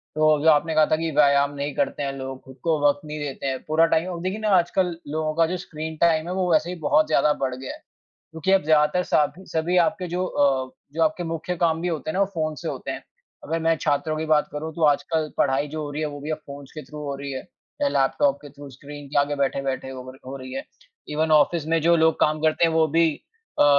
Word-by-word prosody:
तो 155 -1 +4
जो 160 - +6
आपने 155 +2 +3
कहा 155 -1 +6
था - - +5
कि 165 0 -2
व्यायाम 140 -1 +4
नहीं 140 0 -3
करते 145 - -1
हैं 140 - -1
लोग, 130 0 -6
खुद 130 0 -14
को 160 -3 +1
वक़्त 145 +7 +1
नहीं 150 0 -6
देते 140 -2 -5
हैं, 130 -1 -3
पूरा 160 +2 +4
टाइम 165 +3 +2
औ 175 - -4
देखिए 190 +4 -2
ना 215 -1 -1
आजकल 175 0 +1 0.2
लोगों 155 0 -1
का 165 0 +4
जो 185 +2 -2
स्क्रीन 160 -2 -6
टाइम 165 -1 +3
है 180 - -3
वो 185 -2 0
वैसे 155 +2 +3
ही 180 - -4
बहुत 155 0 +3
ज़्यादा 150 -1 +3
बढ़ 130 -2 0
गया 130 0 -7
है, - - -12 0.5
क्योंकि 160 +4 -1
अब 195 - +4
ज़्यादातर 155 +3 +3
साबी 160 +5 0
सभी 165 +3 0
आपके 185 +1 +1
जो 180 +2 -1
अ, 135 -4 +1 0.2
जो 165 - 0
आपके 160 +2 +1
मुख्य 165 +2 -3
काम 165 -1 +1
भी 180 - 0
होते 155 -2 -3
हैं - - -5
ना 195 - +1
वो 200 - +4
फ़ोन 155 -1 -1
से - - -3
होते - - -5
हैं। - - -5 0.4
अगर 165 +2 -2
मैं 165 0 +2
छात्रों 155 +2 0
की 160 - -2
बात 155 -1 +3
करूँ 155 +2 -5
तो 165 - -5
आजकल 155 +1 +1
पढ़ाई 140 +1 +2
जो 155 +1 -5
हो 145 - -5
रही 145 - -4
है 155 - 0
वो 145 -1 -8
भी 150 - -5
अब 155 - -2
फ़ोन्स 140 -1 -10
के 155 - -7
थ्रू 150 +3 -11
हो 140 - -3
रही 140 0 -6
है 130 - -4 0.4
या 285 - +4
लैपटॉप 140 - +2
के 145 - -10
थ्रू 140 0 -11
स्क्रीन 145 +2 -10
के 145 +1 0
आगे 145 +1 0
बैठे-बैठे 135 -1 -1
हो 130 -1 -8
र 135 - -15
हो 135 - -6
रही 130 -1 -9
है। 135 - -4 0.4
इवन 155 +1 0
ऑफ़िस 155 +1 +3
में 165 0 +2
जो 170 +1 +5
लोग 160 0 +3
काम 155 0 +2
करते 155 +2 +2
हैं 165 - 0
वो 160 -1 +4
भी 165 0 +6 0.5
अ, - - +7
155 Hz, 260 wpm, -24 LUFS, 145-165 Hz, 0.5 s, अ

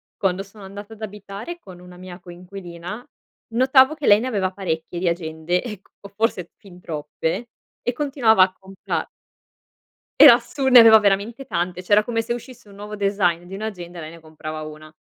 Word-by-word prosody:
quando 195 0 -1
sono 200 +1 -15
andata 200 +3 -10
ad 220 - -16
abitare 210 - -8
con 185 - -13
una 180 0 -14
mia 180 0 -10
coinquilina, 175 +3 -9 0.5
notavo 260 +4 +5
che 300 -3 -6
lei 205 0 +7
ne 245 - -3
aveva 195 -6 -1
parecchie 175 -3 -4
di 180 - -1
agende 170 +1 -1
e 210 -6 -7
co 200 - -16
forse 200 -4 -2
fin 180 -3 -16
troppe, 160 +7 -4 0.3
e 245 - -2
continuava 245 -7 +3
a 185 0 0
compra 190 0 -5 1.1
Era - - +11
assu 275 -2 -3
ne 255 -2 +9
aveva 225 -1 +9
veramente 210 +6 0
tante, 180 -1 -3
cioè 185 - -12
era 210 +1 +6
come 225 0 -1
se 230 - -3
uscisse 240 -2 -10
un 200 - -15
nuovo 210 +1 -8
design 195 -4 0
di 190 +2 -9
un'agenda 185 -4 -7
e - - -6
lei 155 0 -8
ne 165 - -13
comprava 155 -1 -8
una. 155 0 -10
195 Hz, 185 wpm, -22 LUFS, 175-220 Hz, 1.1 s, Era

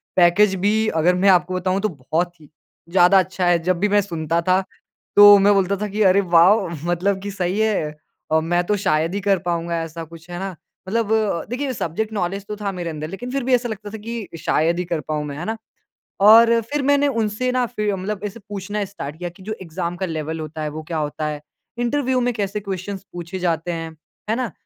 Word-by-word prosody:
Package 185 +3 +5
भी 220 +1 +2
अगर 170 +3 +3
मैं 195 +2 +3
आपको 180 0 +3
बताऊँ 185 +1 0
तो 215 - +1
बहुत 165 +3 -3
ही 150 -2 -17 0.4
ज़्यादा 185 +2 +5
अच्छा 185 0 -1
है। 175 -1 +5
जब 180 0 +1
भी 205 - +2
मैं 205 0 +4
सुनता 165 -3 -2
था 185 +2 +2 0.5
तो 205 0 +10
मैं 200 +1 +5
बोलता 195 0 +2
था 210 +2 -3
कि, 210 +2 -3
"अरे 190 +1 +5
वॉव, 185 +2 +4 0.2
मतलब 180 +3 0
कि 200 +1 -5
सही 185 +1 -2
है। 210 -8 +1 0.4
अ, 160 - +4
मैं 175 +2 0
तो 210 - +1
शायद 165 -3 +1
ही - - 0
कर 200 0 +2
पाऊँगा 170 -1 -1
ऐसा 165 +1 -7
कुछ।" 165 +1 -13
है 175 0 -5
ना? 190 -1 -5 0.3
मतलब 220 +2 -1 0.4
देखिए 260 +2 -2
सब्जेक्ट 215 +2 -3
नौलेज 195 0 -2
तो 210 - -4
था 205 -1 -3
मेरे 175 -3 -4
अंदर 155 -1 -5
लेकिन 245 +7 -6
फिर 275 0 -1
भी 260 +1 +1
ऐसा 245 0 -2
लगता 210 -1 -6
था 220 - -6
कि 225 0 -6
शायद 165 +1 +1
ही 180 - -2
कर 170 -1 -2
पाऊँ 150 -1 -1
मैं, 145 -1 -6
है 170 - -5
ना? 220 +3 -3 0.6
और 230 +3 +7
फिर 295 0 0
मैंने 285 +1 +3
उनसे 230 -1 -1
ना 250 0 +1
फिर 210 -4 -2
मतलब 195 +2 -4
ऐसे 210 +3 -6
पूछना 205 +1 -3
स्टार्ट 160 -7 -8
किया 175 +1 -4
कि 175 +2 -16
जो 215 +2 -4
एग्ज़ाम 170 0 -4
का 190 - -2
लेवल 160 -1 -4
होता 155 0 -6
है 150 - -2
वो 155 +1 -7
क्या 165 +1 -4
होता 150 0 -2
है? 150 -1 -4 0.4
इंटरव्यू 255 +1 +1
में 245 0 0
कैसे 205 -1 -2
क्वेश्चन्स 195 -1 -5
पूछे 175 +2 -6
जाते 170 -1 -1
हैं, 165 -1 -5 0.4
है 220 - +2
ना? 250 -1 -2
190 Hz, 225 wpm, -21 LUFS, 170-210 Hz, 0.6 s, तो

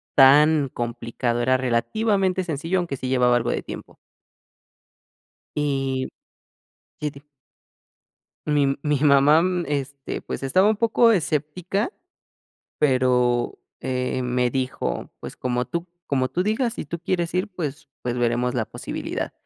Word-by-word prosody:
tan 145 +2 +6
complicado, 120 0 -2
era 130 +2 +3
relativamente 190 - +1
sencillo, 165 +3 -1
aunque 165 -7 -3
sí 130 - -4
llevaba 125 -1 +3
algo 120 - 0
de - - -2
tiempo. - - -9 1.6
Y, 135 -3 -1 0.9
sí 150 - -1
di 140 - -14 1.3
Mi 145 -2 +2
mi 150 -1 +1
mamá, 145 +3 +6 0.2
este, 140 -1 -3
pues, - - -5
estaba 185 +9 +3
un 215 - +3
poco 230 +1 +4
escéptica, 180 - -1 0.9
pero, 125 -3 +2 0.2
eh, 130 0 -1
me 125 0 +1
dijo: 130 0 -2
"Pues, - - -8
como 125 -1 -1
tú 170 +5 -4 0.2
como 130 -2 +1
tú 175 +8 -1
digas, 220 +4 0
si - - -6
tú 170 +3 -4
quieres 175 -1 -1
ir, 185 +4 0
pues 150 -6 -5
pues 125 0 -2
veremos 120 +1 +1
la 115 -3 0
posibilidad", - - -5
140 Hz, 130 wpm, -23 LUFS, 125-170 Hz, 1.6 s, tan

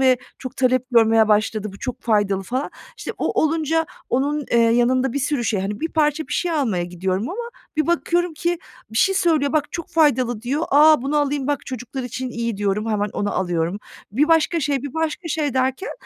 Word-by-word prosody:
ve 255 -2 +4 0.2
çok 255 - -8
talep 255 -1 +2
görmeye 225 -2 +5
başladı, 215 -1 +1
bu 200 - -12
çok 250 -2 -5
faydalı" 205 -4 +1
falan. 255 +7 -3 0.3
İşte, - - -5
o - - 0
olunca 320 0 +1 0.2
onun, 285 +3 0
eee, 235 - +4
yanında 240 +2 +3
bir 285 - -1
sürü 280 -2 -1
şey, 210 -4 0
hani, 205 +6 -4
bir 325 - -1
parça 305 0 +1
bir - - -5
şey 355 - 0
almaya 220 - 0
gidiyorum 185 +4 -2
ama 470 +6 -5 0.3
bir 310 - +1
bakıyorum 345 0 +1
ki 340 +2 -1 0.3
bir 220 - -1
şey 385 - +3
söylüyor, 320 -7 +2
"bak 300 -2 0
çok 335 -2 -5
faydalı" 255 -8 +2
diyor. 280 +6 -1
"A, 300 -1 +6
bunu 285 +2 -1
alayım 285 -2 0
bak 290 -1 -2
çocuklar 255 +1 -5
için 250 +1 -4
iyi" 235 -3 -3
diyorum, 205 +2 -1
hemen 210 0 0
onu 205 0 -1
alıyorum. 175 +1 -1 0.3
Bir 295 +8 +2
başka 325 +1 +3
şey, 275 -2 0
bir 285 - -6
başka 320 +1 -2
şey 295 -4 -1
derken 260 +8 0
260 Hz, 200 wpm, -21 LUFS, 225-305 Hz, 0.3 s, A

